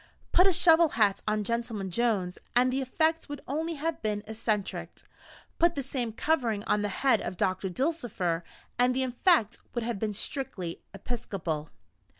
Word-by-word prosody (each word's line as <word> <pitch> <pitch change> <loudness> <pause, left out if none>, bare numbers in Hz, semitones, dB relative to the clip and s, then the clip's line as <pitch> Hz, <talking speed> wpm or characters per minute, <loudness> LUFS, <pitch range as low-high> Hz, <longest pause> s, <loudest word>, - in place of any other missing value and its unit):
Put 365 - +6
a - - +5
shovel 330 -1 +6
hat 205 -3 +3
on 210 0 +1
Gentleman 225 -3 -2
Jones, 200 -5 0 0.2
and 255 +1 +4
the 270 - 0
effect 320 +5 0
would 290 -1 -6
only 320 +4 -2
have 320 +2 -3
been 210 -1 -1
eccentric; 215 -2 -3 0.6
put 340 0 +4
the 280 - -2
same 250 -3 -2
covering 230 -5 0
on 210 - +1
the 205 - -1
head 240 +3 +2
of 185 - -5
Doctor 185 +1 0
Dulcifer, 200 - -1 0.4
and 250 +1 +4
the 265 - +1
effect 250 - +2 0.2
would 240 - -1
have 230 -3 -2
been 210 -1 -2
strictly 195 - -3
episcopal. 190 -8 -4
235 Hz, 160 wpm, -29 LUFS, 205-275 Hz, 0.6 s, Put